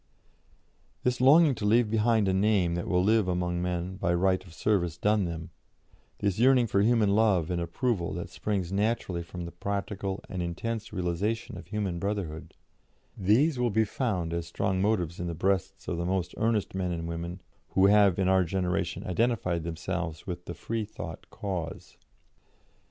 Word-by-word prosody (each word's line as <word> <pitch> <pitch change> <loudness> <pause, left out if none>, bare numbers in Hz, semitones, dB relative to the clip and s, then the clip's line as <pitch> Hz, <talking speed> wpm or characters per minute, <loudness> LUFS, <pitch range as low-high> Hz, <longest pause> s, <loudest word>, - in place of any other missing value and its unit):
" - - -38
This 125 0 0
longing 145 +3 +7
to 110 - -6
leave 110 +1 +3
behind 110 -1 +3
a 95 - +2
name 95 -3 +2
that 85 0 -3
will 90 -1 +2
live 110 0 +3
among 90 -1 -1
men 90 +1 -2
by 85 -1 +1
right 95 +1 +2
of 90 - -15
service 85 -2 0
done 105 +1 +2
them, 85 -1 -5 0.7
this 100 -1 -1
yearning 125 0 +5
for 100 -3 +1
human 110 -2 +3
love 100 -6 +3
and 85 -1 -1
approval 85 +1 -1
that 85 - -5
springs 95 -4 -2
naturally 100 -3 0
from 85 +1 -7
the 85 - -7
practical 100 0 -3
and 90 - -4
intense 110 +6 -3
realisation 100 +6 -2
of 85 -2 -9
human 100 -4 -2
brotherhood 100 -5 -4 0.6
these 125 - +3
will 125 -1 +2
be 110 +1 +2
found 95 -8 -2
as 85 -1 -3
strong 95 +2 -1
motives 90 -5 0
in 90 - -3
the 85 - -3
breasts 95 +2 -1
of - - -2
the 85 - -2
most 95 -1 -1
earnest 110 -2 0
men 95 -1 -1
and 85 -1 -3
women 85 +2 -5 0.4
who 95 - +6
have 100 -2 +5
in 95 -1 +1
our 95 0 +4
generation 90 0 -2
identified 90 -4 0
themselves 85 -1 -4
with 90 -1 -6
the 85 - -6
Freethought 105 -7 -5
cause. 90 -5 -5
95 Hz, 175 wpm, -28 LUFS, 85-105 Hz, 0.7 s, longing